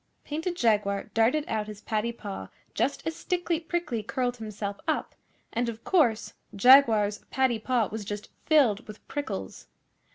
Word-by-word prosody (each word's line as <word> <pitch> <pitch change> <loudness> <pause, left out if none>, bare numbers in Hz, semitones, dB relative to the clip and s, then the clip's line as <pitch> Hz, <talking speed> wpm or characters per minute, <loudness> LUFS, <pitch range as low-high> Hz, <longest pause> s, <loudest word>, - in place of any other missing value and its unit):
Painted 320 +4 -3
Jaguar 210 - +1
darted 245 +7 +3
out 215 -1 -2
his 210 -1 -9
paddy 220 +1 -1
paw 205 -4 -7 0.3
just 280 - -1
as 325 - -2
Stickly 350 -1 -1
Prickly 335 -8 -2
curled 245 +3 -2
himself 210 -2 -5
up, - - -1 0.4
and 235 +1 0
of 230 0 -7
course 240 - +2 0.2
Jaguar's 220 -3 +6
paddy 260 -4 +1
paw 235 -1 +1
was 220 0 -4
just 205 +1 -6 0.2
filled 250 -9 +4
with 215 0 -12
prickles. 95 - -5
230 Hz, 150 wpm, -28 LUFS, 210-280 Hz, 0.4 s, Jaguar's